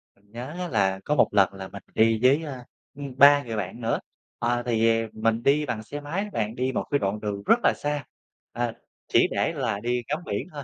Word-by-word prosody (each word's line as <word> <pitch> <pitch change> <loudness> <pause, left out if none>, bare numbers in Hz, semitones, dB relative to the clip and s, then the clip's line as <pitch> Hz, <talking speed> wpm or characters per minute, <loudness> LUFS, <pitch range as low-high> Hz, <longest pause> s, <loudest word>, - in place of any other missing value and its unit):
Mình 100 +1 -30
nhớ 125 +6 -7
á 180 - -2
là 95 - +1
có 150 - +1
một 135 - +5
lần 100 -1 +4
là 95 -1 -7
mình 100 +1 -10
đi 110 0 +4
với, 140 +5 +5
a, 130 -5 -7 0.3
ừm, 140 -2 -8
3 145 +1 +7
người 115 -2 -5
bạn 105 +3 -4
nữa, 115 0 0 0.4
ờ, 120 0 0
thì 115 -1 +2 0.2
mình 115 +1 0
đi 150 +3 +3
bằng 110 -4 -3
xe 145 +6 -7
máy 165 +7 -2
đó 210 - -6
bạn. 110 +1 -2
Đi 130 +1 0
một - - -1
cái 145 - +3
đoạn 100 0 -1
đường 100 -1 -4
rất 235 - +5
là - - +4
xa, 145 0 -2 0.5
à, 120 -1 -2 0.3
chỉ - - +4
để - - 0
là 100 - -2
đi 120 +2 -1
ngắm 150 +4 -1
biển 115 - -3
thôi, 145 -1 -6
120 Hz, 235 wpm, -25 LUFS, 110-145 Hz, 0.5 s, 3